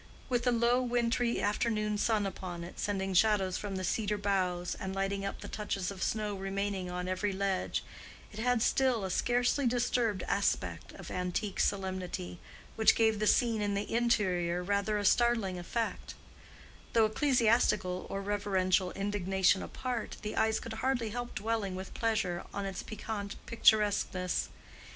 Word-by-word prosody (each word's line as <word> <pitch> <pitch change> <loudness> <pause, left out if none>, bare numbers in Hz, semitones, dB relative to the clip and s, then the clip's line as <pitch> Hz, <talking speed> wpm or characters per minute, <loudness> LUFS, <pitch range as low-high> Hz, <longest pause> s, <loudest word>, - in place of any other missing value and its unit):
With 245 -1 0
the 245 - +4
low 240 +1 +3
wintry 240 -1 +1
afternoon 210 0 0
sun 215 -2 +2
upon 180 -3 -5
it, 175 - -10
sending 195 -2 -1
shadows 190 -1 +3
from 205 -2 -4
the 190 - -3
cedar 210 +2 0
boughs, 185 -3 0
and 190 -1 -5
lighting 195 0 -1
up 195 - -4
the - - -7
touches 200 -3 -3
of 190 -1 -9
snow 210 -1 -1
remaining 195 -1 -2
on 180 0 -3
every 185 +2 -1
ledge, 195 -1 -1 0.5
it 215 - -9
had 245 0 +2
still 255 -5 +2
a 190 - -3
scarcely 245 +5 +2
disturbed 235 -4 +1
aspect 200 0 -1
of - - -9
antique 180 +3 -2
solemnity, 185 -2 -2 0.4
which 220 - +5
gave 220 -2 +3
the 215 - +1
scene 230 -2 +3
in 205 -1 0
the 200 +2 -3
interior 185 -7 +1
rather 200 +2 0
a 205 - -2
startling 225 -6 +3
effect; 225 +6 -3 0.8
though, 225 -1 +5
ecclesiastical 220 -6 +2
or 195 0 -3
reverential 190 -2 +1
indignation 195 -1 +1
apart, 250 -3 -4
the 210 - -4
eyes 220 0 +2
could 230 - -7
hardly 250 -4 0
help 245 +1 -5
dwelling 215 -3 -1
with 190 +1 -7
pleasure 215 -6 0
on 200 0 -2
its 195 -1 -4
piquant 210 -2 -5
picturesqueness. 205 -5 +2
205 Hz, 155 wpm, -31 LUFS, 190-225 Hz, 0.8 s, which